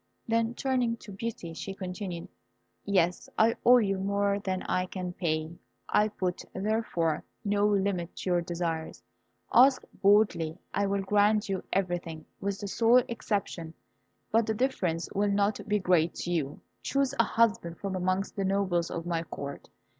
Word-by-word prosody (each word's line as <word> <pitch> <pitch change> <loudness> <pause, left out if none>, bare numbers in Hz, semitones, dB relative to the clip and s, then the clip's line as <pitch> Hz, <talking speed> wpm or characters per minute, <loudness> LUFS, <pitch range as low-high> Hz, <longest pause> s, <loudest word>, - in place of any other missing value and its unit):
Then 230 +1 +1
turning 250 -3 0
to 215 - -12
Beauty, 195 -4 -5
she 195 +4 -6
continued, 180 -2 -5 0.6
"Yes, 180 -3 +1
I 225 +1 +4
owe 250 +1 +8
you 195 -5 +1
more 200 +1 +1
than 190 -2 -2
I 185 0 0
can 180 -1 -5
pay. 155 -3 -1 0.4
I 210 - +3
put, 185 -4 -3
therefore, 190 -6 0 0.2
no 205 0 +2
limit 195 -4 0
to 185 - -3
your 175 -1 +3
desires. 170 -2 -3 0.5
Ask 260 +2 +6 0.2
boldly, 195 -6 +3 0.2
I 200 0 +1
will 195 0 0
grant 210 +1 +3
you 190 -2 -2
everything, 175 -4 -2
with 200 0 -3
that 200 - -4
sole 235 +4 +5
exception; 195 -8 -3 0.6
but 225 0 +3
the 220 - 0
difference 185 -9 0
will 205 +1 +1
not 200 +1 +1
be 210 0 +2
great 180 -4 +2
to 175 - -4
you. 150 -5 -2 0.2
Choose 275 -1 0
a - - +7
husband 200 -8 +1
from 195 -1 -4
amongst 185 +2 -1
the 195 - -1
nobles 190 -3 +1
of 170 0 -4
my 170 -1 -1
Court. 140 -4 -7
195 Hz, 160 wpm, -29 LUFS, 175-210 Hz, 0.6 s, owe